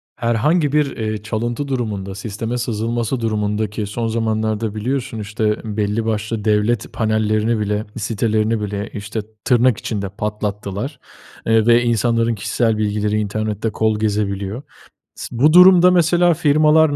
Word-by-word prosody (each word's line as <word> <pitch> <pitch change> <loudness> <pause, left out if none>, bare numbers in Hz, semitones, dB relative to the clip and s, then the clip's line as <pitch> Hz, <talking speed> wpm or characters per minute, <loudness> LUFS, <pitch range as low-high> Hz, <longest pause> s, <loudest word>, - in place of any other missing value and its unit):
Herhangi 140 +7 +1
bir, 150 -2 +1
eee, 110 -1 -3
çalıntı 120 +5 -3
durumunda, 105 -7 -3
sisteme 110 +3 -4
sızılması 115 +1 -2
durumunda 105 -1 -1
ki 105 +1 -4
son 115 +3 -3
zamanlarda 110 -1 -1
biliyorsun, 125 +1 -3
işte, 105 +1 -1 0.2
belli 105 +2 0
başlı 110 0 -2
devlet 105 +1 +1
panellerini 110 0 +1
bile, 105 +1 -1
sitelerini 110 0 0
bile, 100 0 -4
işte, 110 +1 -4 0.2
tırnak 125 -2 +3
içinde, 100 -3 -4
patlattılar, 105 - -4 0.5
eee, 110 -1 +3
ve 120 0 +5
insanların 115 0 +1
kişisel 110 +2 0
bilgileri 105 0 0
internette 110 +1 -2
kol 110 0 0
gezebiliyor. 105 +1 -2 0.5
S - - -7
bu 150 +4 +5
durumda 180 0 +8
mesela 175 0 +4
firmalar, 155 -1 +4
110 Hz, 130 wpm, -19 LUFS, 105-120 Hz, 0.5 s, durumda